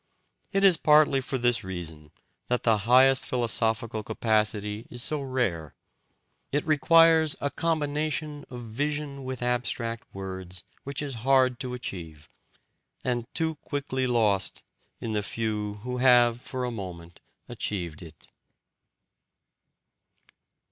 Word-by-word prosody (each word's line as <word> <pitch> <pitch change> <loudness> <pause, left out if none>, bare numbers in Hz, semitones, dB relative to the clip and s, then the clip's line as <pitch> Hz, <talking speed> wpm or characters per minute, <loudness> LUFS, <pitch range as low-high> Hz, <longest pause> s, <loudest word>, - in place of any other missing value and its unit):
It 195 -1 +1
is 190 -4 +6
partly 150 -3 +5
for 130 +1 -3
this 120 -1 +1
reason 80 -5 -7 0.4
that 125 0 0
the 110 -2 +3
highest 130 +1 +6
philosophical 115 -2 0
capacity 105 -1 0
is 120 0 -2
so 150 0 +1
rare: 120 - -2 0.8
it 145 +1 0
requires 160 +1 +5
a 145 - -1
combination 150 -1 -2
of 125 -1 -8
vision 140 +4 -3
with 130 -1 -5
abstract 120 -1 -2
words 95 -2 -7 0.2
which 140 +1 -3
is 140 -2 -4
hard 130 -1 +3
to 125 -1 -4
achieve, 85 - -8 0.8
and 120 0 -2
too 160 -2 0
quickly 135 -3 -2
lost 110 -6 +1 0.4
in 115 - -4
the 105 - 0
few 105 -1 -3
who 125 0 -3
have 120 -2 +5
for 130 -1 -4
a 125 - -3
moment 90 -6 -8 0.3
achieved 85 -7 -4
it. 80 -2 -13
125 Hz, 120 wpm, -27 LUFS, 105-140 Hz, 0.8 s, is